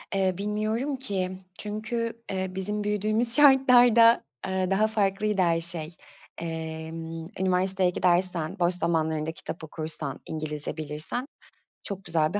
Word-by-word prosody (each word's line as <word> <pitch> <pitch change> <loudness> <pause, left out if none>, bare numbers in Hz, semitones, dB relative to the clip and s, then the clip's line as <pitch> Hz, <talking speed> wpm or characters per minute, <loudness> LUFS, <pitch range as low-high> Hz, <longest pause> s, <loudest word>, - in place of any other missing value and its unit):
Eee, 190 -1 +1
bilmiyorum 215 +7 -2
ki 200 -8 -3 0.3
çünkü, 220 +2 -3 0.2
eee, 190 -1 -2
bizim 210 +2 -3
büyüdüğümüz 215 +3 0
şartlarda, 245 -5 +6 0.2
eee, 190 0 -1
daha 210 +3 +3
farklıydı 210 -1 0
her 170 -2 +2
şey. 165 -1 +7 0.4
Emm, 160 0 -6
üniversiteye 185 0 +1
gidersen, 180 0 0
boş 175 0 +2
zamanlarında 160 -3 -1
kitap 160 0 -8
okursan, 155 -2 -5
İngilizce 155 -1 -4
bilirsen 155 - -3 0.6
çok 195 -1 -6
güzel 160 -2 0
bir 205 - 0
185 Hz, 120 wpm, -26 LUFS, 165-215 Hz, 0.6 s, şey